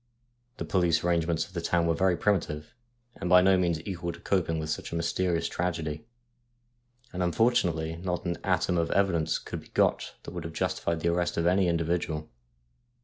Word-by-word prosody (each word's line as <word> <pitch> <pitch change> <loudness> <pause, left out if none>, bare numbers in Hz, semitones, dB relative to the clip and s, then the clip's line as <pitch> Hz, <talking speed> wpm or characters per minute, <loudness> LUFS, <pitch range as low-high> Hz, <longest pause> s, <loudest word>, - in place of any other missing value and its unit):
The - - -4
police 85 -3 +2
arrangements 85 -1 +1
of 95 - -18
the 85 - -3
town 85 0 +1
were 85 - +2
very 90 +1 +2
primitive, 80 -7 -1 0.4
and 90 - -4
by 90 +1 +8
no 95 +1 +5
means 85 -3 0
equal 90 -3 -3
to - - -12
coping 85 -4 0
with 80 0 -3
such - - -4
a - - -3
mysterious 85 +1 0
tragedy, 80 +2 -3 1.1
and 90 - -3
unfortunately 90 -5 +1
not 90 +1 -3
an 85 -1 -2
atom 90 -1 +1
of 85 - 0
evidence 95 -5 +2
could - - -6
be - - -17
got - - +1
that - - -8
would 85 -1 -5
have 80 0 -6
justified 85 0 -1
the 85 - +1
arrest 85 0 0
of 85 - +1
any 90 +1 +3
individual. 85 -2 -1
85 Hz, 185 wpm, -28 LUFS, 80-90 Hz, 1.1 s, by